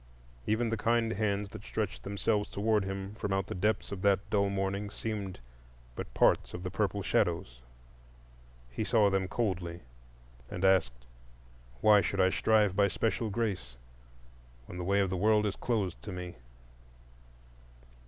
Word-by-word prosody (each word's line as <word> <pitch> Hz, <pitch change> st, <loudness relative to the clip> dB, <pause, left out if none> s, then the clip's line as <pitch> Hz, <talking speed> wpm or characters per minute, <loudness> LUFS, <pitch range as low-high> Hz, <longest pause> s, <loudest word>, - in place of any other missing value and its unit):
Even 115 Hz, +1 st, +1 dB
the 115 Hz, -, 0 dB
kind 115 Hz, +1 st, +1 dB
hands 100 Hz, -1 st, -1 dB
that -, -, -10 dB
stretched -, -, -3 dB
themselves 105 Hz, +1 st, -1 dB
toward 105 Hz, 0 st, +1 dB
him 95 Hz, +1 st, -5 dB
from 105 Hz, -2 st, -4 dB
out 95 Hz, 0 st, +1 dB
the -, -, -5 dB
depths 105 Hz, +3 st, 0 dB
of 100 Hz, -2 st, -5 dB
that 100 Hz, -1 st, +2 dB
dull 100 Hz, -1 st, +2 dB
morning 100 Hz, +1 st, -2 dB
seemed 105 Hz, -3 st, -5 dB, 0.6 s
but -, -, -6 dB
parts -, -, +3 dB
of 90 Hz, -, -6 dB
the 90 Hz, -, -4 dB
purple 100 Hz, 0 st, -1 dB
shadows. 85 Hz, -, 0 dB, 1.1 s
He -, -, -2 dB
saw 105 Hz, -3 st, +3 dB
them 95 Hz, -1 st, +1 dB
coldly, 90 Hz, -5 st, -2 dB, 0.7 s
and 90 Hz, +2 st, -2 dB
asked, 60 Hz, -11 st, +2 dB, 0.8 s
"Why 105 Hz, -1 st, +7 dB
should 100 Hz, -, -2 dB
I 95 Hz, 0 st, +4 dB
strive 105 Hz, -3 st, +3 dB
by 100 Hz, 0 st, +4 dB
special 110 Hz, +2 st, -1 dB
grace 95 Hz, -, -2 dB, 0.9 s
when 90 Hz, -, -8 dB
the -, -, -3 dB
way 100 Hz, +3 st, +2 dB
of 95 Hz, -2 st, 0 dB
the 95 Hz, -, -1 dB
world 105 Hz, 0 st, +4 dB
is 100 Hz, -, -1 dB
closed 105 Hz, -7 st, -2 dB
to 105 Hz, -, -7 dB
me?" 90 Hz, -1 st, -6 dB
100 Hz, 155 wpm, -31 LUFS, 95-105 Hz, 1.1 s, Why